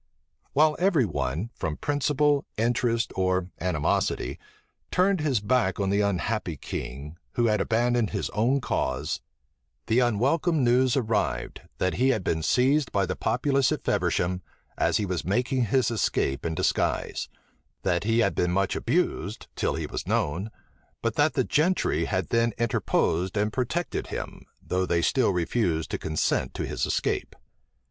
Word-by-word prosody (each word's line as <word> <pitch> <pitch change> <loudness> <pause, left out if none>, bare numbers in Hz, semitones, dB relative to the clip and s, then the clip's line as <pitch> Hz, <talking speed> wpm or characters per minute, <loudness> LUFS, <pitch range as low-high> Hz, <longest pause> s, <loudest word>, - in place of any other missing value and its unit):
While 155 +1 +4
every 175 - +3
one, 85 - -2
from 80 -2 -3
principle, 145 0 +1
interest, 115 +1 +1
or 95 -1 0
animosity, 85 -5 0 0.5
turned 185 -1 +2
his 140 -6 +1
back 105 -3 +1
on 100 -1 +1
the 100 +1 +2
unhappy 100 -3 -1
king, 70 +5 -6 0.2
who 120 - +1
had 105 -2 +2
abandoned 120 0 +1
his 100 - -3
own 125 +6 +1
cause, - - -2 0.6
the 115 +3 +2
unwelcome 135 - +2
news 125 +2 +3
arrived, 115 -4 -1 0.2
that 95 0 0
he 130 - +5
had 110 -7 +1
been 80 -2 0
seized 135 - +2
by 100 -1 +1
the - - -3
populace 135 +3 +1
at - - -2
Feversham, 90 +1 0 0.3
as - - +2
he 105 - -1
was 90 -3 -2
making 125 +6 +1
his 125 +2 +2
escape 75 -9 0
in 80 - -3
disguise; 95 - 0 0.5
that 90 -1 +1
he 115 +2 +2
had - - +2
been 90 - +1
much 95 +1 +1
abused, 100 +7 -1
till - - 0
he - - -3
was - - -5
known; 85 +9 0 0.5
but - - +1
that - - +2
the - - +3
gentry 175 +5 +1
had 95 -4 -1
then 115 -1 +2
interposed 95 -5 0
and 105 +1 0
protected 135 +8 -2
him, - - -6 0.2
though 90 0 -1
they 85 -1 +1
still 130 - +3
refused 85 -2 0
to - - -2
consent 80 0 -1
to - - -2
his - - -2
escape. - - -1
110 Hz, 155 wpm, -26 LUFS, 90-130 Hz, 0.6 s, he